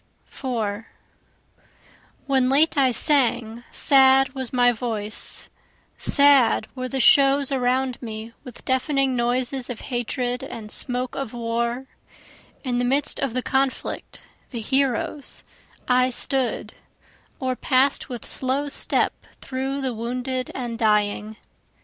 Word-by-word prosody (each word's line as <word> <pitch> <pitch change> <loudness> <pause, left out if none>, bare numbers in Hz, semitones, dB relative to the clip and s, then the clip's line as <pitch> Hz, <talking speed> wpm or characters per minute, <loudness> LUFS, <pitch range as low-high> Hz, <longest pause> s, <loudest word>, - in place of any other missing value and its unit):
4 225 -4 -4 1.4
When 265 -2 +2
late 300 +5 +3
I 270 -3 +4
sang 240 -4 +2
sad 270 -1 +4
was 260 -3 -3
my 245 -1 +4
voice, 220 -3 -4 0.5
Sad 280 -7 +4
were 255 -1 -4
the 270 - -2
shows 275 +2 +5
around 255 -1 0
me 225 -1 -7
with 250 -2 -12
deafening 265 0 +1
noises 250 +2 0
of 245 - -6
hatred 245 +1 -2
and 215 -2 -8
smoke 250 -1 0
of 270 -4 -5
war; 235 +2 -2 0.8
In 245 -3 -1
the - - +1
midst 275 +4 0
of 265 -4 -2
the 255 - -1
conflict, 265 0 -2 0.3
the 240 - -5
heroes, 270 +3 -1 0.4
I 255 0 +3
stood, 260 0 -1 0.7
Or 255 -1 -1
pass'd 265 +2 +2
with 245 -4 -7
slow 270 +3 -1
step 285 - +1 0.3
through 270 +1 -3
the 260 -2 -2
wounded 250 +3 -3
and 240 -3 -4
dying. 210 -1 +1
255 Hz, 120 wpm, -23 LUFS, 235-270 Hz, 1.4 s, shows